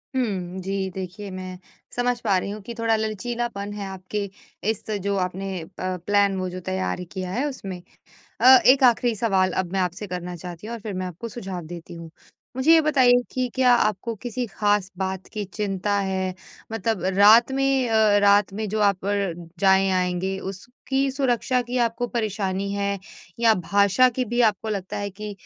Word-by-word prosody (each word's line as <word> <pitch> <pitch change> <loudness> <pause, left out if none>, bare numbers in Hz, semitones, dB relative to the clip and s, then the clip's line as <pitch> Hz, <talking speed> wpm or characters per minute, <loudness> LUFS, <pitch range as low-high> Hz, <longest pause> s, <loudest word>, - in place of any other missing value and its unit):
हुँ। 190 -7 -2
जी 195 0 -2
देखिए 190 +2 -6
मैं 185 0 -7 0.4
समझ 245 0 0
पा 200 -4 +2
रही 190 - -2
हूँ 210 +1 -6
कि 235 - -7
थोड़ा 225 -1 +2
लचीलापन 220 -1 -3
है 205 -1 -5
आपके, 190 +2 -5 0.4
इस 220 - -2 0.2
जो 200 +1 -1
आपने 185 -1 -3 0.2
प 185 0 -2
प्लान 200 -1 +3
वो 185 0 -2
जो 185 - -6
तैयार 95 - -3
किया 185 -2 -4
है 255 +8 -1
उसमें। 195 -10 -6 0.6
अ, 260 +2 +9
एक 265 +1 +6
आखिरी 240 -1 +4
सवाल 195 -4 +2
अब 180 -2 -2
मैं 195 - +1
आपसे 180 +3 -2
करना 180 -1 -5
चाहती 175 +3 -8
हूँ 235 - -5
और 235 - -5
फिर 210 -2 -5
मैं 185 0 -3
आपको 180 +6 -7
सुझाव 190 -7 -6
देती 170 +1 -9
हूँ। 165 -1 -9 0.5
मुझे 260 +5 +3
ये 325 - +7
बताइए 255 -5 +4
कि 255 -1 -1
क्या 255 -1 +5
आपको 215 -1 +1
किसी 245 +1 -3
खास 205 -2 0
बात 190 0 -3
की 210 -1 -3
चिंता 205 -1 -2
है? 190 -1 -1 0.4
मतलब 225 -3 -1
रात 220 +5 +7
में 270 -2 +1
अ, 220 -2 +4
रात 200 -1 +4
में 215 +2 -3
जो 215 +2 -1
आप 200 -2 +2
र 200 -3 0 0.3
जाएँ-आएँगे, 190 -1 +2
उसकी 250 +7 -3
सुरक्षा 255 -1 +1
की 245 +1 -4
आपको 235 0 0
परेशानी 200 -4 -2
है? 200 0 -1 0.4
या 230 -1 +5 0.2
भाषा 200 +5 +5
की 250 +1 -2
भी 240 +2 +1
आपको 220 -1 +1
लगता 195 -3 -3
है 205 0 -3
कि 210 +2 -7
200 Hz, 180 wpm, -24 LUFS, 190-235 Hz, 0.6 s, अ